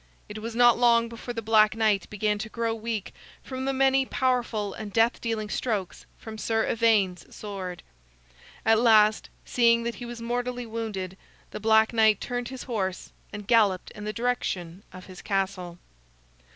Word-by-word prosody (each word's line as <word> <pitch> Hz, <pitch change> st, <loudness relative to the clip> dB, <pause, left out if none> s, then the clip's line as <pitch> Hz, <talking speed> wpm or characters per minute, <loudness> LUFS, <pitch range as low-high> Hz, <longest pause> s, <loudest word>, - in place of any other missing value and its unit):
It 210 Hz, +1 st, -7 dB
was 230 Hz, +1 st, -6 dB
not 240 Hz, 0 st, +5 dB
long 235 Hz, -1 st, +4 dB
before 235 Hz, +1 st, -7 dB
the 230 Hz, -, -4 dB
Black 215 Hz, 0 st, +4 dB
Knight 215 Hz, -3 st, +1 dB
began 210 Hz, 0 st, -1 dB
to 220 Hz, +1 st, -5 dB
grow 230 Hz, 0 st, -2 dB
weak 225 Hz, -2 st, -4 dB, 0.3 s
from 260 Hz, 0 st, -5 dB
the 270 Hz, -, +1 dB
many 270 Hz, 0 st, +3 dB
powerful 240 Hz, -6 st, -1 dB
and 215 Hz, -2 st, -7 dB
death 225 Hz, +3 st, +2 dB
dealing 225 Hz, -2 st, -2 dB
strokes 210 Hz, -4 st, -3 dB
from 220 Hz, -1 st, -9 dB
Sir 225 Hz, 0 st, 0 dB
Ivaine's 210 Hz, -6 st, +1 dB
sword. 190 Hz, -4 st, -7 dB, 0.8 s
At 225 Hz, 0 st, +5 dB
last, 220 Hz, -2 st, +4 dB, 0.2 s
seeing 235 Hz, -1 st, +3 dB
that 235 Hz, 0 st, -2 dB
he 240 Hz, -, -5 dB
was 240 Hz, -1 st, -7 dB
mortally 245 Hz, +1 st, -3 dB
wounded, 215 Hz, -5 st, -5 dB, 0.3 s
the -, -, -6 dB
Black 220 Hz, +1 st, +3 dB
Knight 220 Hz, -3 st, +4 dB
turned 245 Hz, -1 st, -4 dB
his 260 Hz, +1 st, -7 dB
horse 195 Hz, -7 st, -3 dB, 0.2 s
and 210 Hz, -1 st, -7 dB
galloped 205 Hz, -5 st, +2 dB
in 210 Hz, -, -10 dB
the 210 Hz, -, -2 dB
direction 200 Hz, -7 st, -3 dB
of 185 Hz, -1 st, -11 dB
his 185 Hz, -1 st, -11 dB
castle. 190 Hz, -3 st, -2 dB
220 Hz, 165 wpm, -26 LUFS, 205-235 Hz, 0.8 s, not